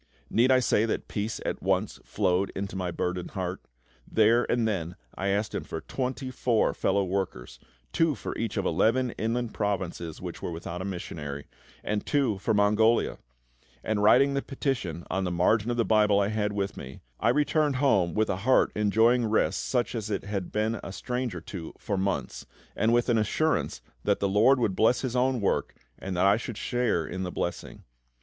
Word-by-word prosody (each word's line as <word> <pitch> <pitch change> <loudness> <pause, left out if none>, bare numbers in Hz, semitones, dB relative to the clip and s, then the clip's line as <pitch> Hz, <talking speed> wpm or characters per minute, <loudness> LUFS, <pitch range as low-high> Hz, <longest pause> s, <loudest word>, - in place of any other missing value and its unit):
Need 120 +3 +4
I 130 - +6
say 115 -3 +2
that - - -2
peace 105 +2 -3
at - - -3
once - - 0
flowed 95 -1 0
into 95 0 -4
my 90 -1 -2
burdened 90 +1 -3
heart? 90 0 -3 0.5
There 115 +2 +4
and 120 -2 +2
then 90 -5 -2 0.2
I 100 - -3
asked 100 +2 0
Him - - -3
for 80 - -6
twenty 130 0 -4
four 120 -3 +1
fellow 100 +1 +1
workers, 90 -11 -3 0.3
two 165 -3 +2
for - - -6
each 115 -1 -3
of 100 - 0
eleven 115 +9 +2
inland 115 +1 -2
provinces 95 -5 -3
which - - -7
were - - -3
without 85 +1 -6
a - - -4
missionary, 75 -6 -5 0.4
and 105 0 -1
two 130 -9 +1
for - - -1
Mongolia; 105 +2 +3 0.6
and 110 -1 0
writing 135 +7 +5
the 140 - 0
petition 120 - -3
on 95 - 0
the 90 - -1
margin 105 +6 +2
of 120 - -1
the 115 - +2
Bible 105 -2 +4
I 100 0 +1
had 105 -1 -1
with 100 -1 -2
me, 65 - -9 0.2
I - - +2
returned 150 +1 +2
home 100 - +2
with 110 -1 +2
a 95 - -2
heart 125 +7 +3
enjoying 110 +3 +3
rest 110 - +1
such 125 -2 0
as 110 -3 -4
it 100 - -2
had 100 -3 -4
been 110 +1 0
a - - -6
stranger 125 -3 -3
to 85 -1 -8
for 105 - -3
months, 95 0 -2 0.3
and 110 +2 +2
with 120 0 +3
an 120 -3 +3
assurance 155 +9 0 0.2
that - - +1
the 100 - +1
LORD 110 +7 +4
would 105 -6 0
bless 115 +4 +3
His 130 -2 -3
own 125 -1 +2
work 100 - 0 0.2
and 95 -2 -4
that 90 - +3
I 100 +2 +5
should 115 -1 -6
share 120 -10 0
in 95 +3 -5
the 90 -1 -3
blessing. 85 - -4
105 Hz, 195 wpm, -27 LUFS, 95-120 Hz, 0.6 s, I